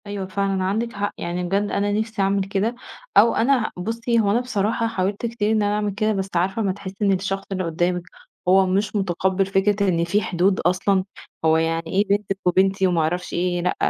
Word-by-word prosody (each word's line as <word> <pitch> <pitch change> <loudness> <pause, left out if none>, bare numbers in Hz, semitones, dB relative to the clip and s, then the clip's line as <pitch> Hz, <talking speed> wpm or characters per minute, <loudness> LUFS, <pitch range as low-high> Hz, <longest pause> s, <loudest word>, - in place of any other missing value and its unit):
أيوة 200 -1 -4
فعلًا 195 0 -1
عندِك 220 +5 -1
حق، 205 0 -2
يعني 175 +1 -3
بجد 200 +3 0
أنا 205 +1 0
نفسي 220 0 -1
أعمل 195 0 +2
كده، 200 +4 -1 0.4
أو 230 - +6
أنا 245 -1 +2
ه - - -9
بُصّي 230 +3 0
هو 205 -2 +2
أنا 230 - +3
بصراحة 230 -2 -1
حاولت 200 0 -2
كتير 225 -2 -1
إن 215 -1 +2
أنا 205 0 +1
أعمل 210 -1 -1
كده 215 +2 0
بس 195 -1 -2
عارفة 190 +5 +1
أمّا 195 -3 +1
تحسّي 195 0 -8
إن 200 -1 +3
الشخص 195 +1 -2
اللي 185 -1 -1
قُدّامِك 175 +1 -1 0.4
هو 190 +1 +5
مش 195 +3 0
مُتقبِّل 190 0 0
فكرة 200 +1 +1
إن 170 -2 +1
في 195 +5 +1
حدود 185 +1 +1
أصلًا، 185 +2 +1 0.4
"هو 160 0 +4
يعني 165 0 0
إيه 195 +5 +1
بنتِك 200 -1 0
وبنتي 190 +1 +3
وما 175 -2 +1
أعرفش 175 +3 -2
إيه، 175 0 0
لأ 180 - 0
195 Hz, 205 wpm, -22 LUFS, 185-210 Hz, 0.4 s, أو